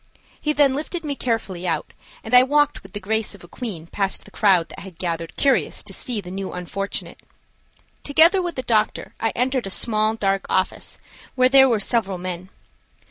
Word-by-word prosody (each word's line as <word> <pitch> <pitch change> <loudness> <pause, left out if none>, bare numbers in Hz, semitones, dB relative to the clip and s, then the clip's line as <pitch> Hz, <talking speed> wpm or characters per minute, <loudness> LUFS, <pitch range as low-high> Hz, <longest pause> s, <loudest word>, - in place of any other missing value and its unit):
He 300 - +1
then 285 -3 +4
lifted 315 +4 -4
me 290 - -1
carefully 205 -8 -2
out 160 -3 -2 0.3
and 220 - -7
I 250 - +10
walked 290 +2 +2
with 195 -2 -15
the 205 - -4
grace 215 +1 -1
of 195 - -16
a - - -12
queen 190 -7 -6
past 195 +3 -2
the - - -14
crowd 190 -5 +3
that - - -10
had 190 -4 -11
gathered 170 -2 -3
curious 275 -2 +1
to - - -7
see 245 -6 -3
the 180 -3 -8
new 195 0 -5
unfortunate. 190 +3 -4 0.8
Together 330 +6 +5
with 350 -2 -3
the 255 - -3
doctor 220 -3 0
I 225 - +1
entered 255 -2 0
a - - -4
small 215 +2 +2
dark 195 -2 0
office, 185 - -1 0.4
where 255 0 +4
there 265 0 +7
were 230 -3 +2
several 200 -3 0
men. 180 0 -6
215 Hz, 190 wpm, -22 LUFS, 190-260 Hz, 0.8 s, I